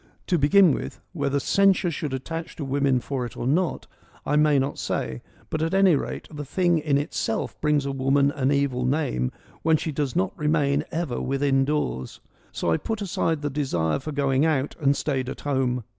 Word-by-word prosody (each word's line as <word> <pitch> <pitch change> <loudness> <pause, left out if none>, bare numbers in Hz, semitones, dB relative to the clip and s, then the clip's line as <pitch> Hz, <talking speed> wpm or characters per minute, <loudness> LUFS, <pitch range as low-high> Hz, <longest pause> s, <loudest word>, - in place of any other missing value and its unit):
To 175 -3 +1
begin 175 +5 +6
with - - -5
— - - -45
whether 140 0 +1
censure 195 +2 +3
should 150 -2 -4
attach 160 +5 -5
to 145 - -5
women 135 -2 +1
for 135 0 -3
it - - -13
or - - -4
not, 165 +6 0 0.4
I 150 - +1
may 150 -1 +4
not 135 +1 -1
say 65 -1 -3
— - - -28
but 155 - -1
at 165 +3 0
any 195 -4 +5
rate, - - -4
the 150 -1 -5
thing 175 +3 +1
in 150 -2 +1
itself 140 -5 -2
brings 150 -2 +2
a 140 - -1
woman 135 +1 +2
an 140 -1 0
evil 140 -3 +1
name 125 - 0 0.3
when 160 0 +3
she 155 - -3
does 140 -3 -2
not 95 0 0
remain 150 -1 +1
ever 165 -7 -2
within 135 0 +1
doors. 140 - -2 0.3
So 85 - -1
I 80 - +3
put 220 -2 -3
aside 165 -5 -1
the 145 - -1
desire 130 - 0
for 155 +3 -6
going 140 -1 +1
out 150 -3 +1
and 140 -2 +2
stayed 130 -4 -1
at - - -7
home. 130 -4 0
140 Hz, 205 wpm, -25 LUFS, 135-155 Hz, 0.4 s, begin